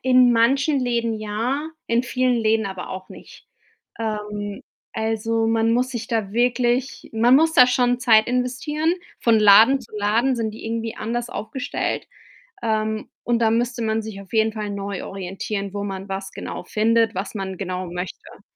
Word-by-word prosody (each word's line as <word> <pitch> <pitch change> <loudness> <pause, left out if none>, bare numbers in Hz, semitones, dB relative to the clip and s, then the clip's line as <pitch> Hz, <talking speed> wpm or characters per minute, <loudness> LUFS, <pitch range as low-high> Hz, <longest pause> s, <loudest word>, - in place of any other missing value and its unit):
in 255 -1 +5
manchen 270 +5 +3
Läden 235 -2 0
ja, 235 +8 -2 0.2
in 230 +1 +2
vielen 255 -1 +1
Läden 220 -1 +2
aber 190 -2 -5
auch 185 0 -7
nicht. - - -14 0.5
Ähm, 210 -2 -4 0.3
also, 225 +1 0
man 225 0 +2
muss 250 +2 +1
sich 235 -2 -5
da 220 -5 -2
wirklich 245 +2 0
man 235 +3 +5
muss 320 +2 +3
da 250 -5 +7
schon 245 0 +2
Zeit 220 -3 +5
investieren. 255 +7 0 0.3
Von 230 -2 +4
Laden 215 +6 +7
zu 230 - -16
Laden 225 +6 +1
sind 220 -2 -2
die 220 - -10
irgendwie 225 0 -3
anders 240 +2 -3
aufgestellt, 225 +5 -3 0.5
ähm, 220 -1 -1
und 240 -1 +1
dann 225 -1 +3
müsste 240 0 -2
man 220 0 0
sich 215 -2 -8
auf 195 - -16
jeden 220 0 +3
Fall 210 -2 -4
neu 200 -1 -4
orientieren, 195 +1 -5
wo 200 - -3
man 195 0 -6
was 195 0 -4
genau - - -6
findet, 225 0 +2
was 195 +4 -4
man 190 -2 -4
genau 185 -1 -4
möchte. 180 +1 -7
225 Hz, 170 wpm, -22 LUFS, 210-245 Hz, 0.5 s, da